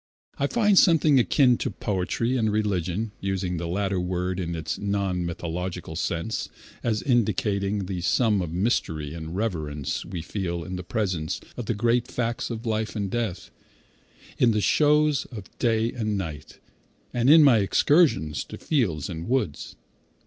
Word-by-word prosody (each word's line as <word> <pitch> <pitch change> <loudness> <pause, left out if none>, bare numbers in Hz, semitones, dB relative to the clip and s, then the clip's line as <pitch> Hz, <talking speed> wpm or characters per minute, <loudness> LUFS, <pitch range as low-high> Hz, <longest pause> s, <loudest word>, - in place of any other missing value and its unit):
I 140 - +2
find 210 0 +4
something 155 -5 +5
akin 125 0 +4
to - - -1
poetry 105 +5 -1
and 110 -4 +1
religion 105 0 -1
(using 95 -2 -2
the 85 +1 -3
latter 95 +1 -1
word 90 +1 -2
in 85 -2 -3
its 80 - -4
non 100 -3 -1
mythological 85 0 -4
sense, 85 +5 -2 0.3
as 110 -3 0
indicating 105 -5 +1
the 90 -1 -4
sum 105 +2 +2
of 85 -3 -4
mystery 80 -6 -1
and 80 0 -6
reverence 80 -9 -2
we 85 -4 -6
feel 85 -2 -3
in 95 +2 -6
the 90 - -4
presence 90 -4 -2 0.2
of 120 - -6
the 115 - 0
great 120 +2 +1
facts 115 -1 -2
of 115 0 -5
life 110 0 -1
and 100 -3 -2
death) 105 -6 -3 0.9
in 115 -2 +4
the 105 - +1
shows 150 +2 +3
of 105 -6 -10
day 115 -1 +1
and 110 -5 -2
night, 80 -7 -6 0.6
and 120 +1 +2
in 155 +1 +9
my 130 -6 +6
excursions 105 - +3
to - - -9
fields 100 - 0
and 85 +3 -6
woods. 120 - -1
100 Hz, 155 wpm, -25 LUFS, 90-120 Hz, 0.9 s, in